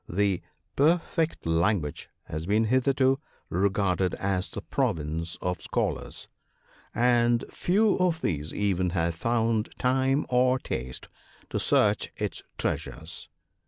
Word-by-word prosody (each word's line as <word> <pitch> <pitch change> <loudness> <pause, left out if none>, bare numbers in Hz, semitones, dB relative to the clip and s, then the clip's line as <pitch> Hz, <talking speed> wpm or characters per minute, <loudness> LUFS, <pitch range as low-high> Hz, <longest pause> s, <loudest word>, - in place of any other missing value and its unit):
The 100 0 +1 0.3
"perfect 165 +2 +1
language" 80 -1 0
has 80 +2 -5
been 105 +3 +3
hitherto 130 +3 +3 0.3
re 95 +4 +3
garded 95 -2 0
as 95 -1 -1
the 100 - -6
province 85 - -1
of 90 0 -1
Scholars, - - -2 0.7
and 120 0 +3
few 205 +4 +2
of 175 -3 +1
these 75 -1 -2
even 95 -3 0
have 85 0 +1
found 115 +3 0
time 130 +2 +2
or 125 +1 +3
taste 65 - -4 0.4
to - - 0
search - - +2
its - - -3 0.2
treasures. 80 +2 -4
105 Hz, 120 wpm, -27 LUFS, 90-130 Hz, 0.7 s, been